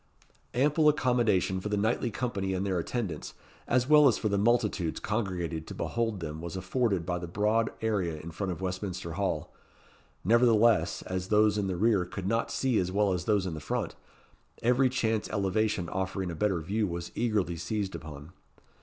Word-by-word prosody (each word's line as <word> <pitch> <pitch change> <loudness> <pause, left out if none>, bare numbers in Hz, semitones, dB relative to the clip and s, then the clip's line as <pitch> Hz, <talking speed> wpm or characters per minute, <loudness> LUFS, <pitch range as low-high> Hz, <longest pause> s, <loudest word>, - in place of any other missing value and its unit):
Ample 150 +4 +4
accommodation 120 -10 +2
for 105 - -4
the 105 - 0
knightly 110 +4 +1
company 100 -5 -2
and 95 +2 -1
their 95 -3 0
attendants, 90 -4 -4 0.3
as 125 +1 +2
well 150 -1 +7
as 120 - +3
for 110 - -1
the 100 - +1
multitudes 105 -6 +1
congregated 90 -7 -2
to - - -7
behold 115 -5 -2
them 80 -1 -5
was 85 +1 -5
afforded 95 -1 0
by 90 0 -1
the 90 - -6
broad 105 +5 +1
area 95 -8 -1
in 85 +2 -8
front 95 +3 -3
of 85 0 -6
Westminster 95 -2 -4
Hall; 95 +4 -2 0.7
nevertheless, 115 0 +4
as 95 0 -3
those 105 0 +4
in 105 -2 0
the 95 -2 -2
rear 105 -1 +3
could 90 +1 -6
not 115 +2 0
see 130 -4 +1
as 90 0 -1
well 100 0 +2
as 90 -1 -3
those 105 -3 +2
in 80 -4 -4
front, - - -2 0.7
every 125 +2 +4
chance 115 -4 0
elevation 100 -2 0
offering 95 -1 -2
a - - -5
better 95 -1 0
view 105 +6 -1
was 85 -1 -5
eagerly 105 -7 0
seized 95 +4 -3
upon. 75 0 -9
100 Hz, 180 wpm, -29 LUFS, 90-115 Hz, 0.7 s, well